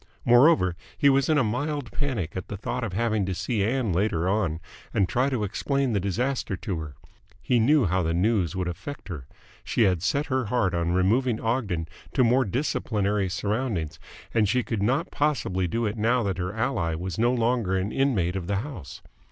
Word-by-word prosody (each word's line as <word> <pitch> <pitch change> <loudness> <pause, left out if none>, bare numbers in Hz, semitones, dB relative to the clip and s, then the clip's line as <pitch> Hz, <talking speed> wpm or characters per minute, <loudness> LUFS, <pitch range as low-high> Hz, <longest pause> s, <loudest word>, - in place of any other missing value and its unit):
Moreover, 120 - +5 0.2
he 140 - +5
was 135 +1 +2
in 155 - +4
a 140 - +4
mild 130 +3 -2
panic 120 - -3
at 95 - -5
the 105 - -5
thought 125 +4 -3
of 105 -6 -3
having 110 0 +1
to 95 - -2
see 110 +1 -1
Ann 115 -2 0
later 90 -2 +1
on 95 -5 0 0.4
and 95 - +3
try 130 +7 +1
to 125 -6 -1
explain 130 +5 -1
the 100 - +2
disaster 105 +2 -1
to 90 -2 -4
her. 75 -3 -7 0.4
He 125 - +1
knew 140 +3 +4
how 95 +1 +1
the 80 -1 0
news 95 -2 +1
would 90 -1 -2
affect 100 - -7
her. 75 -8 -6 0.4
She - - +1
had 90 -5 +2
set 140 - 0
her 130 -4 0
heart 105 -4 +1
on 85 0 0
removing 110 +6 +2
Ogden 110 -9 -1 0.3
to 130 - +3
more 125 +2 +3
disciplinary 105 -4 0
surroundings, 100 - -2 0.3
and 110 -4 +3
she 125 +3 +2
could 110 -3 -3
not 135 - 0
possibly 120 -11 0
do 115 +7 -1
it 105 +1 -2
now 120 +3 +2
that 95 -2 -2
her 90 +1 -2
ally 110 -8 -1
was 90 +5 -4
no 120 +2 +3
longer 115 -5 +1
an 95 +3 -2
inmate 105 -11 +1
of 90 -3 -4
the 100 - 0
house. 125 - -6
110 Hz, 200 wpm, -26 LUFS, 95-125 Hz, 0.4 s, Moreover